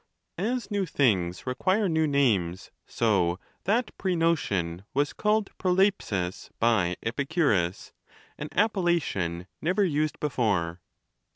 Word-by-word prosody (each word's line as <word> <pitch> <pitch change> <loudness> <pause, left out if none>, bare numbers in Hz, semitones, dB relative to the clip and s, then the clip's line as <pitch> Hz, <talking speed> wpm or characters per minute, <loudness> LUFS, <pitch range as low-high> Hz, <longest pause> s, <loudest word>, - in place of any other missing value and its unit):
As 235 +4 -2
new 200 -2 0
things 95 - +1
require 185 +11 +1
new 160 -2 +2
names, 105 - +1 0.2
so 95 -6 +1 0.3
that 225 +5 +1
prenotion 155 - 0
was 145 +1 +1
called 210 -1 +1
Trpohi^ig 180 - 0
by 105 -7 +2
Epicurus; 115 - 0 0.5
an 150 - -5
appellation 170 - 0 0.2
never 185 +6 +2
used 155 -4 0
before. 100 - 0
140 Hz, 100 wpm, -27 LUFS, -, 0.5 s, new